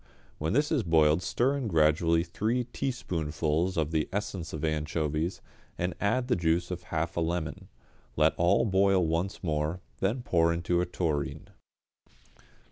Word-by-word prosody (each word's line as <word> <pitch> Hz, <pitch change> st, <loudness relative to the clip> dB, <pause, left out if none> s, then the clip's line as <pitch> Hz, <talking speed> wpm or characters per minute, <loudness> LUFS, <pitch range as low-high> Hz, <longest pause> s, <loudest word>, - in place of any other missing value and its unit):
When 80 Hz, +4 st, -1 dB
this 145 Hz, +4 st, +2 dB
has 150 Hz, -6 st, +2 dB
boiled 80 Hz, -2 st, +3 dB
stir 130 Hz, +8 st, +1 dB
in 130 Hz, -4 st, -2 dB
gradually 80 Hz, -1 st, +3 dB
three 110 Hz, +8 st, -1 dB
teaspoonfuls 85 Hz, -, -2 dB
of 80 Hz, -1 st, 0 dB
the 80 Hz, -2 st, 0 dB
essence 95 Hz, -4 st, -3 dB
of 80 Hz, 0 st, -3 dB
anchovies, 80 Hz, +2 st, -1 dB, 0.4 s
and 90 Hz, 0 st, -1 dB
add 120 Hz, +5 st, +1 dB
the 125 Hz, -, +2 dB
juice 85 Hz, +1 st, 0 dB
of 90 Hz, -1 st, -4 dB
half 85 Hz, +1 st, -2 dB
a -, -, +2 dB
lemon; 80 Hz, -2 st, -3 dB, 0.5 s
let -, -, +4 dB
all 85 Hz, +6 st, +3 dB
boil 95 Hz, -2 st, +3 dB
once 85 Hz, +5 st, -2 dB
more, 80 Hz, +1 st, -1 dB, 0.2 s
then 115 Hz, +6 st, 0 dB
pour 85 Hz, -6 st, +3 dB
into 85 Hz, +1 st, 0 dB
a 90 Hz, -, -1 dB
tureen. 80 Hz, -5 st, -2 dB
85 Hz, 150 wpm, -29 LUFS, 80-95 Hz, 0.5 s, let